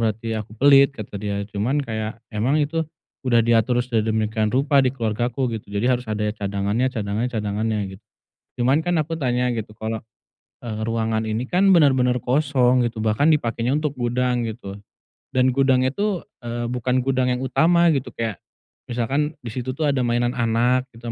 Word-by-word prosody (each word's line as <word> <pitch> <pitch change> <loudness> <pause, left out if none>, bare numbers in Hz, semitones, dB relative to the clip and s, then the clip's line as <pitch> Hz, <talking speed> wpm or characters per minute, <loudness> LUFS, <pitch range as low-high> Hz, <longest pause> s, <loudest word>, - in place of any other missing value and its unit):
berarti 115 0 -1
aku 110 +1 -9
pelit," 140 +2 +6
kata 105 -4 -9
dia, 100 -1 -2
"cuman 115 +8 0
kayak, 110 0 -4 0.2
emang 125 +8 +1
itu 160 +3 -1 0.4
udah 120 -2 +3
diatur 115 +1 +3
sedemikian 110 -2 0
rupa 140 +3 +3
di 130 - +3
keluargaku," 120 +1 -1
gitu, 110 - -7
"jadi 115 +5 +1
harus 125 - -11
ada 105 0 -1
ya 105 - -1
cadangannya, 100 +4 -1
cadangannya, 110 +2 -2
cadangannya," 105 +1 -1 0.2
git - - -22 0.6
cuman, 135 +6 +3
kan 175 -2 +1
aku 165 +2 -2
tanya, 125 -4 0
gitu, 110 -1 -5
kalau, 110 0 -4 0.6
eee, 110 -1 -4
ruangan 110 0 -1
ini 115 +4 -2
kan, 190 +4 +3
benar-benar 130 -7 +4
kosong, 130 -1 +2
gitu, 115 -2 -2
bahkan 110 +8 +2
dipakainya 120 -4 0
untuk 150 -2 -2
gudang, 125 -1 0
gitu. 110 -3 -6 0.6
Dan 130 0 +4
gudangnya 130 0 +2
tuh, 205 +1 -1 0.2
eee, 120 0 -4
bukan 125 +1 0
gudang 130 -1 +1
yang 125 +1 -1
utama, 170 +4 +4
gitu. 135 -3 -1
Kayak, 110 -5 -3 0.5
misalkan, 135 +6 -1
di 115 - -6
situ 130 +2 -4
tuh 155 - -3
ada 135 - 0
mainan 120 +1 +1
anak 120 +2 +1
gitu, 115 0 -6
120 Hz, 170 wpm, -22 LUFS, 110-130 Hz, 0.6 s, pelit